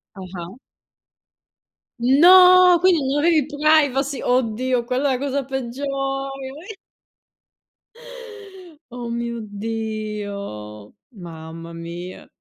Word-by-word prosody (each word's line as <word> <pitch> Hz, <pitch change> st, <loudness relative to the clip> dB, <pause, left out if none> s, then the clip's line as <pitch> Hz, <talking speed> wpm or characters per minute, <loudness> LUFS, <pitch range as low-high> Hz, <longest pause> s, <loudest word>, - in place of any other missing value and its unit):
Ah-ah. 185 Hz, -2 st, -8 dB, 1.5 s
No! 360 Hz, +7 st, +7 dB
Quindi 355 Hz, -5 st, +3 dB
non 275 Hz, +2 st, 0 dB
avevi 315 Hz, -1 st, +3 dB
privacy. 290 Hz, -3 st, +1 dB
Oddio, 250 Hz, 0 st, 0 dB
quella 260 Hz, +3 st, 0 dB
è 255 Hz, -, -1 dB
cosa 280 Hz, 0 st, -2 dB
peggiore, 265 Hz, +1 st, -5 dB
o 275 Hz, 0 st, -3 dB, 0.4 s
e 435 Hz, -, -8 dB, 2.2 s
Oh, 240 Hz, -1 st, -6 dB
mio 235 Hz, 0 st, -4 dB
Dio, 205 Hz, -, -6 dB, 0.2 s
mamma 165 Hz, -3 st, -10 dB
mia. 170 Hz, +2 st, -9 dB
245 Hz, 85 wpm, -21 LUFS, 200-280 Hz, 2.2 s, No